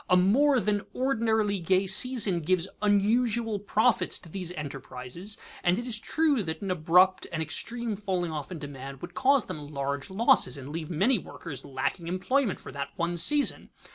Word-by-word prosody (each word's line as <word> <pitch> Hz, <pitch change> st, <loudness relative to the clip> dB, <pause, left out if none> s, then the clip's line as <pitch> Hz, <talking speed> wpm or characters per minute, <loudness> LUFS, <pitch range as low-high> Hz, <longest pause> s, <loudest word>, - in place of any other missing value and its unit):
A 180 Hz, -, +5 dB
more 255 Hz, +9 st, +4 dB
than 210 Hz, -2 st, 0 dB
ordinarily 220 Hz, -6 st, +1 dB
gay 185 Hz, +3 st, +2 dB
season 205 Hz, -1 st, +3 dB
gives 180 Hz, +2 st, 0 dB
unusual 215 Hz, +2 st, +2 dB
profits 210 Hz, -1 st, +2 dB
to 165 Hz, -, -14 dB
these 180 Hz, 0 st, -3 dB
enterprises, 140 Hz, +4 st, -6 dB, 0.3 s
and 175 Hz, +1 st, +3 dB
it 240 Hz, -, -4 dB
is 230 Hz, -4 st, -1 dB
true 300 Hz, -1 st, +1 dB
that 160 Hz, -1 st, -4 dB
an 195 Hz, -, -2 dB
abrupt 180 Hz, +2 st, +3 dB
and 165 Hz, -, -3 dB
extreme 230 Hz, +8 st, -2 dB
falling 185 Hz, -4 st, -2 dB
off 150 Hz, -1 st, -5 dB
in 180 Hz, -, -5 dB
demand 140 Hz, -1 st, -8 dB
would 175 Hz, 0 st, -7 dB
cause 270 Hz, +1 st, +3 dB
them -, -, -6 dB
large 140 Hz, 0 st, -3 dB
losses, 215 Hz, -, +3 dB
and 135 Hz, 0 st, -8 dB
leave 155 Hz, 0 st, -5 dB
many 200 Hz, +8 st, +2 dB
workers 145 Hz, -6 st, -8 dB
lacking 140 Hz, +6 st, -3 dB
employment 195 Hz, +6 st, 0 dB
for -, -, -10 dB
that 140 Hz, 0 st, -5 dB
one 170 Hz, -1 st, -1 dB
season. 290 Hz, -, +3 dB
185 Hz, 170 wpm, -28 LUFS, 160-225 Hz, 0.3 s, A